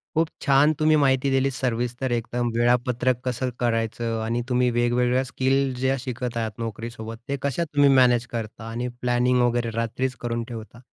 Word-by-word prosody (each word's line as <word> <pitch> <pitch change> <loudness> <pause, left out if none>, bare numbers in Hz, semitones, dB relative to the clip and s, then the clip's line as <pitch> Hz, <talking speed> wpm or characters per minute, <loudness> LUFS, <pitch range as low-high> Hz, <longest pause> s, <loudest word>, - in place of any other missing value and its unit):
खूप 160 0 +3
छान 145 +1 +4
तुम्ही 155 0 +4
माहिती 135 0 +2
दिलीत 135 0 +2
सविस्तर 125 0 -2
एकदम. 120 +1 -1
वेळापत्रक 120 +1 +2
कसं 125 0 -1
करायचं. 115 -1 -1
आणि 120 +2 -1
तुम्ही 125 0 +2
वेगवेगळ्या 125 +2 +2
स्किल 130 +1 0
ज्या 130 +1 +2
शिकत 125 -2 -4
आहात 110 -1 -1
नोकरीसोबत 115 0 -6
ते 140 - -1
कशा 140 +4 -1
तुम्ही 145 -2 +3
मॅनेज 125 -3 +4
करता 115 -1 -5
आणि 120 +2 -3
प्लॅनिंग 125 0 +2
वगैरे 120 -1 +1
रात्रीच 125 +3 -2
करून 115 0 -1
ठेवता. 115 0 -9
125 Hz, 160 wpm, -24 LUFS, 115-130 Hz, -, छान